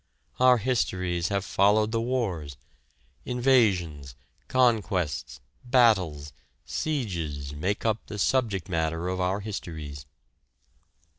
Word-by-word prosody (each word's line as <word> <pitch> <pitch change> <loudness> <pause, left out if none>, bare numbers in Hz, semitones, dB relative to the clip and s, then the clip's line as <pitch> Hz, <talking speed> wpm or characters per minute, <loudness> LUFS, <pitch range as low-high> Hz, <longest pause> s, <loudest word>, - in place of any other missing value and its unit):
Our 125 0 +6
histories 90 -8 -1
have 100 0 -1
followed 105 +3 +3
the 115 0 0
wars. 95 - -2 0.7
Invasions, 100 - +1 0.3
conquests, 90 - 0 0.2
battles, 95 - +2 0.3
sieges 85 - -3
make 95 +10 -2
up 110 -1 0
the 105 - -6
subject 105 -4 0
matter 80 0 -1
of 95 0 -2
our 95 +3 0
histories. 80 - -7
95 Hz, 95 wpm, -27 LUFS, 80-115 Hz, 0.7 s, Our